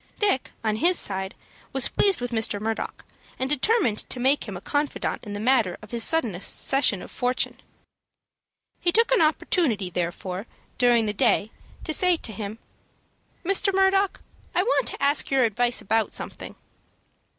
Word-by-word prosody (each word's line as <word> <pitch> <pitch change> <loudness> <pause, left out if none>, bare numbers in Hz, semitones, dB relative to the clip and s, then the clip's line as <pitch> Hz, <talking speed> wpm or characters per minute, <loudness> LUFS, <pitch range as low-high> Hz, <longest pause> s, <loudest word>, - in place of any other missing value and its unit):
Dick, 400 -11 0
on 215 -1 0
his 345 +7 +4
side, 190 -1 -1 0.4
was 270 -2 +3
pleased 395 -9 +3
with 245 0 -3
Mr. 220 -3 +1
Murdock, 220 +1 -4 0.3
and 260 - -1
determined 295 - +2
to 250 - -5
make 265 +1 +2
him 195 -3 -6
a - - -8
confidant 290 +6 -2
in 205 -3 -7
the 205 - -4
matter 225 -5 +2
of 215 - -12
his 235 -1 +1
sudden 320 - +2
accession 205 +4 +1
of - - -11
fortune. 250 0 -1 1.2
He 345 - +1
took 460 +6 +2
an - - +4
opportunity, 295 - +1
therefore, 180 +4 -4 0.3
during 240 -2 +4
the 210 - -1
day, 210 +2 +1 0.3
to 315 - -2
say 360 +1 +3
to 230 - -5
him, 205 +1 -6 0.9
"Mr. 395 +2 +3
Murdock, 385 0 +2 0.3
I 360 - +3
want 480 - +1
to - - -6
ask 280 0 +3
your 270 -1 +3
advice 240 +2 +1
about 220 +1 0
something." - - -6
245 Hz, 160 wpm, -25 LUFS, 210-325 Hz, 1.2 s, his